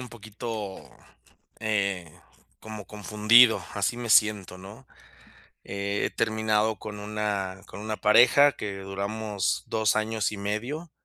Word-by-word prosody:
un 125 -2 -9
poquito, 110 -2 -7 0.7
eh, 100 -6 -1 0.5
como 110 -3 -9
confundido, 105 +3 +4
así 100 +3 -1
me 120 -2 -5
siento, 105 -4 +3
¿no? 105 +8 -13 0.8
He 100 +1 -2
terminado 110 0 +1
con 105 -1 -7
una 105 -3 -3
con 95 - -10
una 110 +1 -4
pareja 125 +7 +5
que 100 -2 -6
duramos 100 +1 -3
2 110 -1 +1
años 110 0 -1
y 105 - -6
medio 120 +11 -4
105 Hz, 120 wpm, -26 LUFS, 100-110 Hz, 0.8 s, pareja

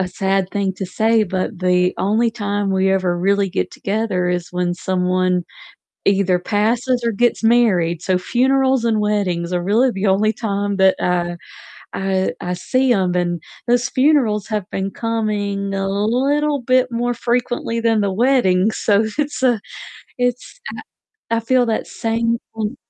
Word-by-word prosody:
a 185 - 0
sad 190 +1 -1
thing 200 -2 -1
to 190 0 -5
say, 220 +4 +2
but 185 +1 -3
the 180 0 +2
only 220 +4 +1
time 205 -3 -2
we 190 0 +2
ever 185 -2 0
really 200 +2 +1
get 90 - -2
together 200 -3 -1
is 180 0 -3
when 180 0 -1
someone 185 0 0 0.6
either 195 -2 +2
passes 230 +6 0
or 230 - +2
gets 240 +2 0
married, 195 -8 +3
so 185 0 +1
funerals 260 +5 +1
and 225 -2 +1
weddings 185 -5 -1
are 175 - 0
really 225 +8 +2
the 195 -1 -2
only 205 +3 +2
time 200 -2 -2
that, 190 0 +4
uh, 175 -1 0 0.6
I 190 -1 -1
I 180 0 -3
see 255 +8 +1
'em, 185 -5 +1
and 175 -1 -1 0.3
those 240 0 +2
funerals 255 -7 +2
have 210 -3 -2
been 195 0 -3
coming 205 -3 -2
a 195 0 -1
little 270 +9 0
bit 255 +1 +2
more 240 +1 -1
frequently 240 -1 -1
than 225 -1 +2
the 200 -2 0
weddings, 215 -4 +2
so 210 0 +2
it's 290 -2 -2
a 245 -4 +3 0.6
it's 245 - -2
I - - -7 0.6
I - - 0
feel 250 +2 +2
that 225 -1 -1
same 230 +1 -1 0.2
thin 215 -1 -3
205 Hz, 160 wpm, -19 LUFS, 185-235 Hz, 0.6 s, that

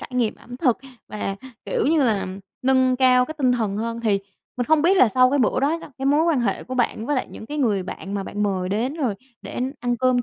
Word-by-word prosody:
trải - - -9
nghiệm 240 -4 +1
ẩm 245 +1 -11
thực 255 -4 +2 0.3
và, 200 -2 -4 0.3
kiểu - - 0
như 315 -1 +3
là, 220 -6 +1 0.4
nâng 260 -1 +3
cao 250 -1 +5
cái 315 - -7
tinh 255 -3 +3
thần 220 -5 -1
hơn. 230 +2 -3
Thì 215 -4 +2 0.4
mình 245 -1 -1
không 315 -1 +4
biết 365 +4 +4
là 255 - +6
sau 255 +3 +4
cái 285 - +2
bữa 250 0 +2
đó 295 +5 +1
đó, 295 - -12
cái 270 - -2
mối 290 +3 +4
quan 320 -6 +2
hệ 240 - -1
của 255 - -6
bạn 235 -2 0
với 290 0 0
lại 255 - -1
những 220 - -10
cái 300 +4 -5
người 215 -8 +1
bạn 195 +2 -7
mà 200 - -1
bạn 205 +1 -4
mời 190 -3 0
đến 230 +8 -1
rồi 265 -10 -1 0.3
để - - -6 0.2
ăn 245 -1 0
cơm 255 0 +2
250 Hz, 260 wpm, -23 LUFS, 220-270 Hz, 0.4 s, là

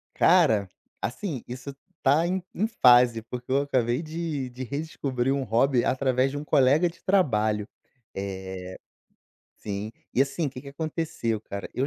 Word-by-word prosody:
Cara, 100 -3 +4 0.3
assim, 135 - -4
isso 130 +3 -7 0.3
está 150 +5 +3
em 185 +1 -1
em 210 - +1
fase, 125 - +5
porque 125 +2 -8
eu 135 - +4
acabei 130 0 0
de 155 -4 -3
de 125 +1 -6
redescobrir 135 -2 -2
um 140 - -1
hobby 120 +3 +2
através 130 0 +1
de 145 - -5
um 150 - -6
colega 150 +4 +4
de 165 - -15
trabalho. 110 - +2 0.5
Eh 95 -1 -6 0.9
Sim. 105 +1 -4 0.2
E, 130 - +5
assim, 140 +3 -2
que 130 -1 -9
que 140 - -10
aconteceu, 155 -7 -2
cara, 100 -2 -7
eu 130 - 0
130 Hz, 150 wpm, -26 LUFS, 115-150 Hz, 0.9 s, fase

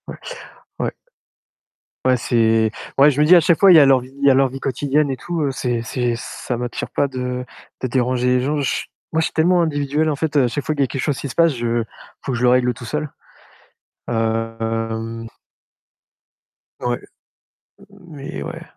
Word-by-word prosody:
Ouais, - - -7 0.6
ouais. - - -1 1.1
Ouais 130 -1 +4
c'est 115 -2 +2 0.3
ouais, 140 +2 +7
je 145 +1 0
me - - +5
dis 180 - +8
à - - +8
chaque 170 0 +2
fois, 195 -1 +7
il - - +8
y - - +10
a 145 - +7
leur 135 -1 +5
vie 125 +1 -12
il 140 - 0
y - - +8
a - - +5
leur 135 +1 +4
vie 135 +1 -8
quotidienne 140 +2 0
et 130 - -3
tout, 170 +4 -4
heu, 140 - 0
c'est 120 -3 -2
c'est, 120 +1 -1
ça 120 +1 -5
m'attire 120 0 -4
pas 140 - 0
de 125 -1 -4 0.4
de 130 - -1
déranger 125 0 0
les 125 0 +3
gens. 145 +3 -1
J 140 - -1 0.3
moi, 160 - +2
je 160 - +2
suis - - -4
tellement 175 +2 +3
individuel 150 -1 0
en 150 - 0
fait, 155 +1 -3
heu, 135 - +5
à - - +2
chaque 135 +4 -3
fois 155 - 0
qu'il 140 -2 +1
y - - 0
quelque 135 - -5
chose 145 -4 -1
qui - - -4
se - - -8
passe, 165 -2 +4
je 120 -1 -1 0.4
faut - - -3
que 125 - -1
je 120 - -2
le 125 - +5
règle 125 0 +3
tout 120 - -10
seul. 150 +4 -3 1.0
Hem 115 0 -2 1.5
Ouais, 120 0 -1 0.9
mais 165 - -9
ouais. - - -7
130 Hz, 210 wpm, -20 LUFS, 120-150 Hz, 1.5 s, y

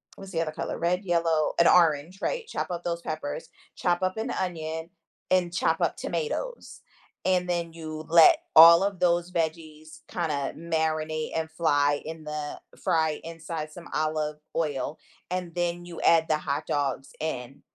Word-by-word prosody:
what's 195 0 -10
the 165 -2 0
other 155 - -2
color? - - -4
Red, 180 +3 0
yellow, 165 -3 +1
and 170 - +6
orange, 165 +1 +4
right? 485 -2 -2
Chop 180 - -3
up 175 0 -4
those 170 -1 -2
peppers, 155 -3 -5 0.3
chop 175 -1 0
up 185 +2 0
an 225 +3 -2
onion, 160 -3 -3 0.4
and 180 -2 +2
chop 165 -1 +1
up 170 - +1
tomatoes, 175 - -4 0.4
and 180 -1 +2
then 170 -2 -1
you 155 -1 -7
let 165 -1 +8 0.2
all 170 +3 +10
of 200 -2 -1
those 175 0 +2
veggies 160 -2 -4
kinda 150 -5 -2
marinate 155 -1 -1
and 160 0 -2
fly 145 -3 +2
in 160 0 -7
the 150 -1 -5 0.2
fry 160 -2 +1
inside 165 -1 -6
some 170 +2 -11
olive 155 -1 -1 0.2
oil, 150 -2 -1 0.3
and 180 -2 -3
then 175 0 -1
you 175 -1 -8
add 165 -1 +4
the 155 - +2
hot 150 0 -2
dogs 140 -1 -2
in, 135 -4 -4
165 Hz, 160 wpm, -27 LUFS, 155-175 Hz, 0.4 s, all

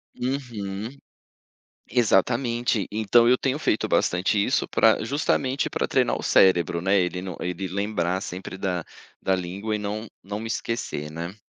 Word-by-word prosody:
Uhum. 115 -6 -4 1.0
Exatamente, 120 0 +2
então 110 +2 +4
eu 125 +1 +5
tenho 135 +3 -1
feito 110 - +1
bastante 95 +3 +2
isso - - +1
pra - - +3
justamente 135 +1 0
pra - - -1
treinar - - +2
o - - -7
cérebro, 85 -3 +4
né, 95 +2 +3
ele 90 0 -1
não 95 -2 -6
ele 90 +2 -3
lembrar 95 -1 -1
sempre 95 0 -6
da 90 -4 -2 0.4
da 95 - +2
língua 95 +4 -3
e - - -1
não 105 +2 -4 0.2
não 100 +2 -5
me 115 - -5
esquecer, 110 -10 -3
né. 85 +4 -6
100 Hz, 150 wpm, -25 LUFS, 90-115 Hz, 1.0 s, eu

